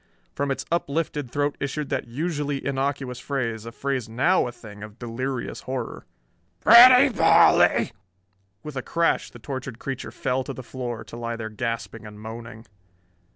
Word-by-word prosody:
From 140 0 -2
its 135 - -2
uplifted 150 -4 -1
throat 145 +2 -1
issued 140 +1 -3
that - - -2
usually 145 +1 -3
innocuous 135 -2 -2
phrase, 115 -5 -3
a - - -6
phrase 130 -2 -3
now 130 +9 +2
a - - -5
thing 105 -4 -12
of 105 0 -10
delirious 125 +1 -4
horror: 130 0 -5 0.5
"Pretty 250 +4 +9
Polly!" - - +5 0.7
With 150 -2 -7
a 130 - -2
crash 170 +5 0
the - - -13
tortured 130 -3 -6
creature 130 -3 -5
fell 125 +3 -1
to 135 - -5
the 130 - -8
floor, 120 -2 -5
to 110 - -11
lie 115 0 -4
there 110 -1 -5
gasping 115 0 -4
and 105 0 -11
moaning. 115 +1 -9
130 Hz, 155 wpm, -25 LUFS, 115-140 Hz, 0.7 s, Pretty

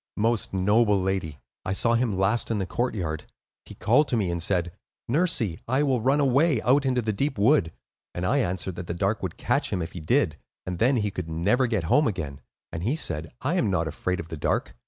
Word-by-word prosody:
"Most 115 0 0
noble 105 +2 +3
lady, 95 -6 -2 0.3
I 95 - -2
saw 115 +4 +1
him 115 -4 +1
last 100 +5 +1
in 115 - 0
the 95 - -1
courtyard. 90 -8 -2 0.4
He - - -11
called 125 +8 +3
to 120 - 0
me 95 -5 0
and 85 -1 -3
said: 90 0 0 0.4
'Nursie, 120 - +1
I 130 +4 +2
will 130 -5 +1
run 135 +5 +2
away 140 0 +3
out 135 +4 +3
into 125 -2 +1
the 110 0 -1
deep 135 +6 -1
wood;' 100 - +3 0.4
and 90 - -2
I 140 +8 +2
answered 95 -5 -2
that 90 -1 -6
the 85 - -3
Dark 100 +5 0
would 95 -3 -4
catch - - 0
him - - -1
if 80 -1 -4
he 90 - -7
did, 85 - +1 0.3
and 90 -2 -4
then 130 +4 +3
he 105 -4 0
could 90 -3 -5
never 100 +11 +1
get 110 -7 -1
home 145 - +3
again; 80 -10 -4 0.3
and 80 - -5
he 120 - 0
said: 80 - 0
'I 145 +6 0
am 115 - +1
not 85 -4 0
afraid 90 +4 -2
of 85 - -7
the 80 - -6
Dark. - - -1
105 Hz, 225 wpm, -26 LUFS, 85-125 Hz, 0.4 s, noble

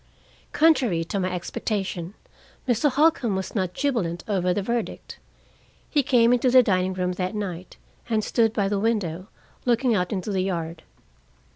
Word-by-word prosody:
Contrary 260 - +3
to 195 +4 -3
my 185 -1 -1
expectation, 185 0 -3 0.5
Mr. 250 +4 +3
Holcombe 275 -6 +2
was 190 0 -4
not 185 -4 -2
jubilant 230 -12 -1
over 185 -4 +1
the 195 +2 -1
verdict. 235 +2 -4 0.7
He 295 - +3
came 245 -3 +4
into 250 +1 +2
the 255 0 +7
dining 185 -3 +1
room 180 -1 -1
that 180 +3 -3
night 185 -4 -5 0.3
and 220 -2 +1
stood 225 -1 +2
by 205 -3 0
the 200 0 0
window, 195 -5 -1 0.4
looking 245 0 +2
out 180 -4 0
into 200 +1 -3
the 190 -1 0
yard. 170 -3 -3
200 Hz, 155 wpm, -24 LUFS, 180-235 Hz, 0.7 s, the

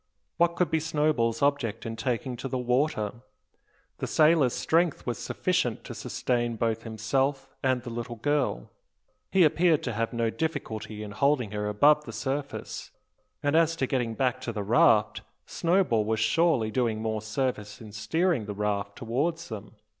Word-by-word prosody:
What 170 0 +3
could 180 -4 +1
be 160 - +2
Snowball's 150 -7 +1
object 140 -7 0
in 115 0 -4
taking 125 +2 -2
to 130 - -4
the 130 - -2
water? 125 -3 0 0.8
The - - -2
sailor's 155 -5 +4
strength 165 -1 +1
was 120 -3 -3
sufficient - - -1
to - - -7
sustain 120 -2 -1
both 115 0 -1
himself 130 +5 -1
and 130 -2 +1
the 120 - -6
little 120 0 -5
girl. 130 - -1 0.6
He 190 -2 +4
appeared 165 0 +3
to 125 - -2
have 115 +2 -1
no 115 -1 0
difficulty 110 -9 -4
in 105 - -7
holding 125 -1 +1
her 105 0 -2
above 150 +8 +4
the - - -8
surface; 140 +1 -4 0.5
and 145 +1 +2
as 165 0 +4
to 140 - 0
getting 125 -4 -1
back 125 0 0
to 115 - -3
the 105 -2 -3
raft, - - +4 0.2
Snowball 170 - +2
was 110 +1 -1
surely 155 -7 +2
doing 115 -2 0
more 110 -1 -2
service 110 -2 -3
in 110 -2 -10
steering 145 - 0
the 105 - -4
raft 100 -1 -2
towards 145 +8 -2
them? 105 -1 -8
125 Hz, 165 wpm, -27 LUFS, 110-150 Hz, 0.8 s, sailor's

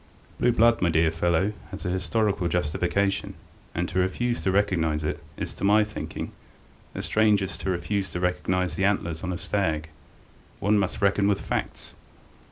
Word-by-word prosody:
Blue 120 - +4
blood, 115 0 +4
my 90 - +3
dear 80 0 +3
fellow, 85 +5 +1 0.2
has - - -8
an 90 - 0
historical 95 +1 0
justification, 90 +4 0 0.4
and 85 +2 0
to 90 - -1
refuse 120 +7 0
to 95 - 0
recognize 85 -6 +1
it 75 - -3
is, - - -4
to - - -9
my 105 +2 +5
thinking, 105 0 -6 0.6
as - - -3
strange 105 -2 +3
as 90 -4 -4
to 95 - -3
refuse 95 +2 -1
to 90 - -4
recognize 90 0 0
the 95 - 0
antlers 85 -5 0
on 90 - -2
a 90 - -2
stag. 80 -6 -1 0.7
One 105 +2 +3
must 100 +1 -2
reckon 100 0 +3
with 100 -1 +2
facts! - - -4
95 Hz, 175 wpm, -26 LUFS, 85-100 Hz, 0.7 s, my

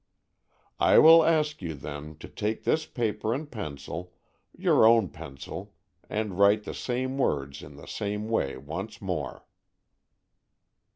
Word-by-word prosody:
"I - - +5
will 165 +1 +9
ask 155 -4 +1
you, 85 -3 -4
then, 75 +2 -8
to - - -8
take 105 +1 -3
this 155 0 +1
paper 110 -1 -1
and 145 +2 -6
pencil, 85 - -6 0.4
your - - +4
own 110 -4 +5
pencil 70 0 -9 0.3
and 105 -3 -3
write 100 +1 +5
the - - -6
same 130 +2 -3
words 70 - -1
in 70 - -12
the 70 - -12
same 105 +1 -4
way 110 -13 -1
once 95 +11 -6
more." 90 -8 -4
105 Hz, 135 wpm, -27 LUFS, 75-120 Hz, 0.4 s, will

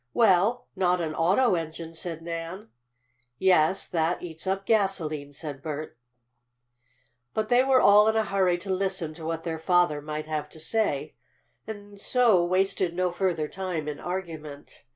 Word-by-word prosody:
"Well, 225 +3 +3
not 180 -1 +2
an 160 -2 -2
auto 190 +10 +3
engine," 165 -1 -4
said 165 0 -5
Nan. 170 +5 -6 0.7
"Yes, 185 0 +3
that 165 0 -1
eats 165 +1 -7
up 195 +1 -1
gasolene," 170 -10 0
said 145 -1 -7
Bert. 155 0 -5 1.4
But 215 0 -1
they 245 +1 +5
were 265 -1 +4
all 210 0 +6
in 220 - +2
a 220 -1 +2
hurry 190 -3 +2
to 190 +2 -5
listen 185 -4 -2
to 160 0 -9
what 165 0 -3
their 160 -1 -3
father 175 -3 +2
might 150 +1 -5
have 155 -1 -3
to 160 - -11
say, 160 -4 -1 0.5
and 205 -2 -9
so 235 -8 +4
wasted 185 -1 +1
no 180 0 +1
further 175 -4 -1
time 180 -4 -4
in 150 -1 -4
argument. 160 -5 -7
175 Hz, 155 wpm, -27 LUFS, 160-195 Hz, 1.4 s, all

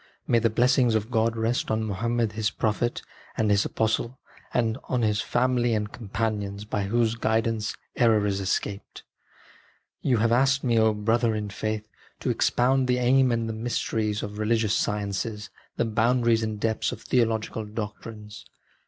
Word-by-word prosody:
May 120 - +3
the 115 0 +2
blessings 125 +1 +3
of 110 +2 -1
God 115 0 +1
rest 115 +2 0
on 110 0 0
Muhammed 115 +2 -1
His 105 0 -1
Prophet 115 +2 -1 0.3
and 110 -1 +2
His 100 0 +3
Apostle, 115 +3 -1 0.4
on 120 +1 0
his 105 -1 +1
family 120 -1 +1
and 105 0 -2
companions, 105 -2 -3
by 105 -2 -2
whose 115 +2 +1
guidance 110 -1 0 0.2
error 110 -3 +3
is 100 -1 0
escaped! 100 +1 -3 1.0
You 125 -3 +2
have 115 +1 +2
asked 135 +3 +3
me, 120 -3 +2
O 110 0 +4
brother 115 +2 +1
in 105 -1 -3
the - - -10
faith, 110 0 -3 0.3
to - - 0
expound 130 +1 +2
the 125 0 +2
aim 130 +1 +4
and 115 -1 0
the 110 - -3
mysteries 110 -2 -2
of 105 0 -6
religious 110 -1 +1
sciences, 105 +1 -2 0.3
the - - +1
boundaries 115 +1 +2
and 110 -1 -3
depths 110 0 0
of - - -8
theological 115 -2 0
doctrines. 105 0 -7
110 Hz, 160 wpm, -26 LUFS, 105-120 Hz, 1.0 s, O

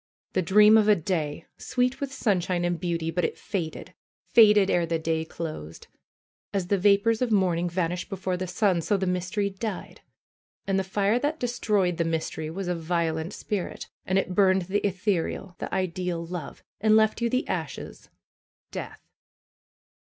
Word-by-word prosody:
The 185 - +2
dream 210 +5 +6
of 210 - +2
a 210 - +6
day! 160 -3 -2
Sweet 250 0 0
with 280 -1 -3
sunshine 180 -8 0
and 175 -1 -1
beauty; 170 -2 -2
but 175 +1 -1
it - - -1
faded, 170 -6 -5 0.3
faded 210 -4 +6
ere 170 -1 +2
the 165 0 0
day 160 0 -1
closed! 155 - -7 0.7
As 190 -3 -2
the 200 - +3
vapors 205 +4 +3
of 250 -2 +1
morning 175 -4 +2
vanish 175 +1 -2
before 190 -2 -2
the 185 +1 -4
sun, 180 -1 +1
so 200 +5 +1
the 190 - -1
mystery 185 +3 -1
died. 195 0 -6 0.6
And 195 0 +1
the - - 0
fire 200 +4 +1
that 295 +4 -1
destroyed 210 -7 0
the 170 - +2
mystery 160 -1 -2
was 185 +3 -5
a 180 - +1
violent 165 0 -1
spirit, 200 -4 -4
and 185 - 0
it 185 -1 0
burned 190 -1 +4
the 190 +4 0
ethereal, 190 -1 -2
the - - -5
ideal 180 -2 -2
love, 175 0 -7 0.2
and 215 +1 +4
left 220 +1 +3
you 235 - +2
the 255 +3 0
ashes - - -5 0.3
— - - -66
death - - -7
185 Hz, 170 wpm, -26 LUFS, 170-205 Hz, 0.7 s, dream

